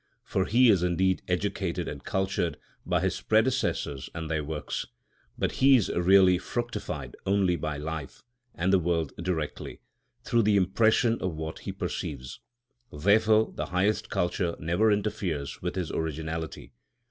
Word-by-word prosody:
For 95 - 0
he 120 +2 +5
is 95 -4 +3
indeed 90 +1 +1
educated 90 -1 -1
and 70 -2 -6
cultured 95 -5 -1 0.3
by - - +1
his - - -1
predecessors 110 - 0
and 80 -1 -4
their 80 -1 0
works; 75 0 -4 0.5
but - - 0
he 135 0 +7
is 115 -7 +2
really 90 0 +5
fructified 100 - -4
only 95 -2 +3
by 75 -3 -3
life 75 -1 -6 0.3
and 95 +3 +1
the 95 - +6
world 85 -4 -1
directly, 85 -4 -3 0.4
through 120 - +2
the 105 -1 +3
impression 110 +5 +3
of 90 -4 -2
what 80 0 -5
he - - -5
perceives; 65 -3 -5 0.5
therefore 110 +7 +3
the - - -4
highest 105 +4 0
culture 85 -2 -1
never 85 +8 +2
interferes 100 -9 -2
with 90 0 -3
his 90 -4 -2
originality. 80 -2 -4
90 Hz, 145 wpm, -28 LUFS, 80-105 Hz, 0.5 s, he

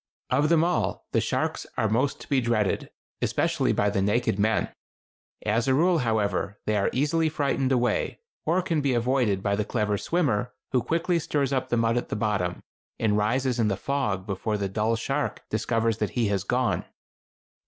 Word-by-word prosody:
Of 145 +4 +3
them 165 -1 +4
all 115 - 0
the - - +2
sharks - - -1
are 110 - +2
most 125 +6 0
to - - -11
be 135 -3 +2
dreaded, 110 -4 0 0.3
especially - - +1
by 100 0 +1
the 100 - 0
naked 105 0 +1
men. 110 +2 +1 0.7
As 115 +4 +1
a 130 - +4
rule, 170 +3 +3
however, 105 -4 0
they 105 - +1
are 100 - +2
easily 155 +4 +1
frightened 140 -3 0
away, 125 -1 +1 0.3
or 175 +4 +1
can 165 -4 0
be 135 -3 +1
avoided 120 -5 +1
by 100 -1 +1
the 105 - 0
clever 105 -2 -1
swimmer, 135 -12 0 0.2
who 125 - +2
quickly 170 +6 0
stirs 140 -3 -1
up 130 - -1
the 120 - +1
mud 115 +1 +2
of 120 - -2
the - - -3
bottom, 105 -5 -1 0.4
and 110 -2 +2
rises 125 +4 +1
in 110 - +3
the 100 -3 0
fog 105 -8 -1
before 105 +2 -2
the 100 -1 -1
dull 110 +4 0
shark 135 +5 -2
discovers 115 0 0
that 105 - 0
he 115 -4 +2
has 100 -2 0
gone. 125 +4 0
115 Hz, 185 wpm, -26 LUFS, 105-135 Hz, 0.7 s, them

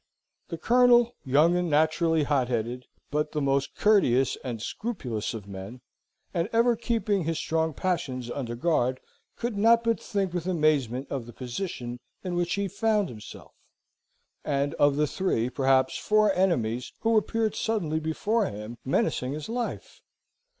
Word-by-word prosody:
The 165 - -5
Colonel, 240 +4 +4
young 150 +6 +4
and 180 -1 0
naturally 160 +1 +2
hot 140 -3 +1
headed, 120 +1 -3 0.2
but 150 +1 -1
the 150 - 0
most 140 -1 0
courteous 135 - +3
and 120 -3 -4
scrupulous 120 - -4
of 105 -3 -7
men, 100 +5 -8 0.5
and 170 +4 -1
ever 235 +1 +3
keeping 225 -4 0
his 165 0 -1
strong 160 -2 -1
passions 130 -10 -2
under 120 -4 -4
guard, 130 -2 +1 0.4
could 240 -2 -3
not 230 +3 +4
but 230 -1 +1
think 195 -3 -2
with 175 0 -3
amazement 145 -7 +1
of 130 -4 -4
the 120 - -10
position 125 - -5 0.2
in 180 -2 -3
which 175 0 0
he 200 0 -1
found, 210 0 +1
himself, 105 -3 -11 0.9
and 140 -1 0
of 145 -1 +4
the 150 +1 +2
three, 130 -8 -1
perhaps 135 -1 +2
four 215 -1 +3
enemies, 125 -11 0
who 225 0 +2
appeared 220 0 +1
suddenly 175 -9 -1
before 200 +7 0
him, 105 +3 -7
menacing 130 0 0
his 150 +4 -6
life. 240 +1 -4
155 Hz, 150 wpm, -27 LUFS, 125-200 Hz, 0.9 s, Colonel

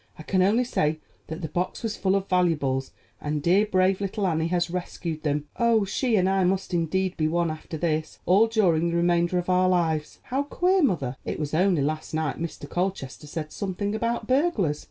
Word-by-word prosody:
I 155 - -9
can 185 +3 +1
only 210 +7 +3
say 155 -10 0 0.3
that 160 +3 -6
the - - -1
box 180 +8 -3
was 220 -2 -2
full 190 0 +1
of 195 0 -1
valuables, 150 -8 +1 0.3
and 150 0 -2
dear, 195 +5 +4
brave 185 0 +2
little 200 +1 -2
Annie 160 -2 +1
has 175 0 0
rescued 170 -3 -4
them. 150 -1 -1
Oh, 230 -3 +3
she 235 +4 0
and 185 -2 +3
I 190 0 +2
must 190 +1 0
indeed 180 +2 0
be 155 - +1
one 170 0 +1
after 155 +1 -7
this, 155 -1 -1
all 200 +6 +5
during 175 -7 +2
the 170 - -2
remainder 175 +1 +2
of 175 - -2
our 185 0 +3
lives. 160 -4 0
How 265 +2 -1
queer, 360 +6 +1
mother; 140 - 0
it - - -4
was 150 -1 -3
only 175 -2 +3
last 155 +2 -3
night 155 -3 -1
Mr. 170 0 -5
Colchester 175 -6 -3
said 155 0 -5
something 200 +1 -3
about 230 +1 -1
burglars. 245 - +1
180 Hz, 200 wpm, -25 LUFS, 155-195 Hz, 0.3 s, all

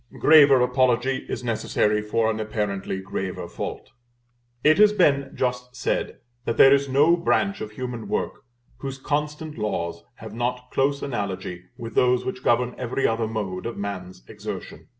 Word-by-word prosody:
Graver 145 -4 +7
apology 125 +1 +1
is - - -4
necessary 105 -2 +1
for 110 +1 +1
an 110 - -4
apparently 105 -3 -2
graver 95 -1 -4
fault. - - -6 0.7
It 155 +5 +5
has 210 0 +7
been 140 -8 +2
just 125 0 -2
said, 125 - -2 0.3
that 115 - -1
there 135 - +8
is 140 0 +2
no 145 +6 +5
branch 195 +3 0
of 110 - -4
human 125 -2 -5
work - - -3 0.3
whose 135 -1 -6
constant 150 +1 -3
laws 85 -5 -3
have 110 -1 -10
not 125 +2 -3
close 140 +1 +1
analogy 95 -7 -4
with 115 -1 -7
those 125 +1 +3
which 130 0 -4
govern 120 +1 +2
every 130 +2 -1
other 115 0 +1
mode 105 -3 -4
of 115 - -6
man's 95 -7 -6
exertion. - - -8
125 Hz, 155 wpm, -24 LUFS, 105-135 Hz, 0.7 s, there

